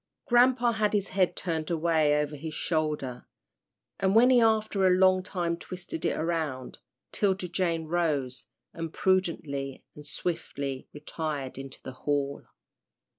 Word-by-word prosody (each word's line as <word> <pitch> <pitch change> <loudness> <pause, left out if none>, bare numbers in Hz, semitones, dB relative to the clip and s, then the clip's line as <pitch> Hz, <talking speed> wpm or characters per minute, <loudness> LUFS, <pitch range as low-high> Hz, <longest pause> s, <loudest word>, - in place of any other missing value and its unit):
Grampa 245 0 +4
had 215 -2 0
his 200 -2 0
head 185 -2 +1
turned 160 -3 -2
away 160 -3 +2
over 150 0 -2
his 155 +2 -6
shoulder, 150 -6 -2 0.7
and 195 +1 +2
when 245 +3 +7
he 245 -2 +6
after 215 -3 +3
a 180 0 +4
long 185 0 +5
time 175 -3 -2
twisted 175 -2 -7
it - - +1
around, 155 -6 -2 0.3
'Tilda 190 -3 +1
Jane 170 -2 -1
rose, 155 -6 -1 0.3
and 165 -1 -5
prudently 160 -8 -1
and 150 0 -12
swiftly 140 -5 -4
retired 150 -3 -4
into 135 -1 -8
the - - -6
hall. 140 +1 -2
165 Hz, 135 wpm, -28 LUFS, 145-185 Hz, 0.7 s, when